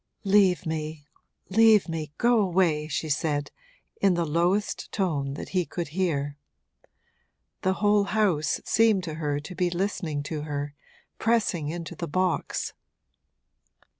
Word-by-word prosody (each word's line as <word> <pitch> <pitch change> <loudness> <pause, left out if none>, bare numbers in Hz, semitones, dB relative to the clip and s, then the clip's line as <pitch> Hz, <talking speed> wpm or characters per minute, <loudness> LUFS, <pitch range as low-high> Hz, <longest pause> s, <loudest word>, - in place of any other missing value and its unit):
'Leave 195 -3 +4
me, 155 -2 -4 0.4
leave 220 0 +5
me, 160 -3 -4
go 240 -1 +4
away!' 175 -6 +2
she 155 +1 -2
said, 145 -1 -1 0.5
in 195 -3 +4
the 170 -1 0
lowest 175 +6 0
tone 145 -8 -1
that - - -7
he 185 -2 +1
could 170 -1 -5
hear. 145 -4 -1 1.2
The 190 - +2
whole 205 +1 +3
house 200 -8 +1
seemed 220 -4 +3
to 160 -3 -4
her 145 -1 0
to 165 +5 -8
be 180 0 0
listening 175 -5 -2
to 150 +1 -4
her, 145 -1 -4 0.5
pressing 205 -9 +1
into 170 +1 -5
the 170 +1 -4
box. 185 +3 -1
170 Hz, 135 wpm, -26 LUFS, 150-195 Hz, 1.2 s, leave